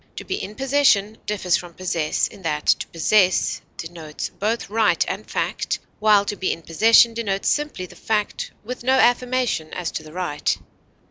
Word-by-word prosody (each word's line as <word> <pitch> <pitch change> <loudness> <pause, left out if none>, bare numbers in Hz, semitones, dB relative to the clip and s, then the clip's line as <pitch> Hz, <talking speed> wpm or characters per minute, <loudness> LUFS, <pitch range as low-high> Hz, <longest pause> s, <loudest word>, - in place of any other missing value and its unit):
To - - -6
be 385 +1 -3
in 210 - -7
possession 260 -6 +2
differs 185 -4 +1
from 175 -2 -10
possess 170 -4 0
in - - -14
that 150 -3 -2
to - - +2
possess 185 +2 +2 0.2
denotes 165 -2 -6
both 220 +3 -2
right 220 +1 +2
and - - -5
fact, - - -1 0.2
while 210 -1 +5
to 205 - -3
be 190 - -1
in 165 - -5
possession 225 +7 +5
denotes 200 -4 -1
simply 295 -11 -1
the - - -14
fact 210 -2 -2
with 245 +2 -6
no 260 +2 +3
affirmation 245 -9 +2
as 180 -2 -3
to - - -4
the 155 -1 -13
right. 170 -4 -1
205 Hz, 175 wpm, -22 LUFS, 175-230 Hz, 0.2 s, while